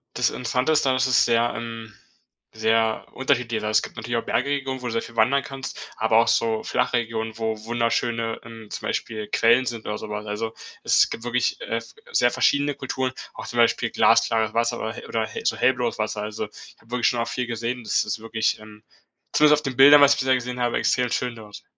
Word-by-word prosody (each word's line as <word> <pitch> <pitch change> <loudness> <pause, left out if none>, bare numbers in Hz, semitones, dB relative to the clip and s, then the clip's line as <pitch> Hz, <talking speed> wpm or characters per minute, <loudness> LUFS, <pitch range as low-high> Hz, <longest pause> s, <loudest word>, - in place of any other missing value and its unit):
Das - - +2
Interessante 125 +4 -1
daran 135 -4 +2
ist, 130 0 +2
es 125 - +3
ist - - +5
sehr, 120 0 +2
ähm, 115 -1 -7 0.6
sehr 110 0 +1
unterschiedlich. 125 -4 0
Also, 105 0 +3
es - - 0
gibt - - -9
natürlich 120 +2 -3
auch 115 - -2
Bergregionen, 135 -1 -1
wo 125 - -6
du 115 - -3
sehr 115 - -1
viel 115 - -12
wandern 130 +5 +3
kannst, 135 -1 -8
aber 110 0 +3
auch 115 - +3
so 110 -1 +1
Flachregionen, 115 -3 -1
wo 110 -1 -2
wunderschöne, 115 0 -1
ähm, 115 -2 -11
zum - - -6
Beispiel 110 -2 -3
Quellen 115 +4 +3
sind 115 -2 -5
oder 105 0 -3
so - - -8
was. 105 0 -4
Also, 110 +2 -4 0.3
es - - +4
gibt 115 - -6
wirklich, 120 0 0
äh, 115 - -2
f 115 - -12 0.2
sehr 120 0 +3
verschiedene 145 +2 +2
Kulturen, 130 -1 -3 0.2
auch - - -8
zum 120 - -7
Beispiel 115 -1 +2
glasklares 110 -1 +3
Wasser 115 +1 0
oder 110 0 -3
he - - -10
oder 110 -1 -1
hell - - -7
so - - +1
hellblaues 125 -3 +1
Wasser. 105 -1 -2
Also, 105 0 -4
ich - - -15
hab 115 - -24
wirklich 125 -1 +2
schon 120 - -1
auch 115 - -1
viel 125 -1 -3
gesehen. 120 +1 -3
Das - - +1
ist 105 +1 -4
wirklich, 110 -1 -1
ähm, 105 0 -14 0.5
zumindest 150 0 +5
auf - - -20
den 130 -3 -3
Bildern, 145 +2 +9
was 140 0 +7
ich - - -4
bisher 130 0 +3
gesehen 125 0 -5
habe, 120 -1 +1
extrem 125 -2 +1
schön 125 -1 -1
dort. 105 -2 -12
115 Hz, 225 wpm, -24 LUFS, 110-125 Hz, 0.6 s, Bildern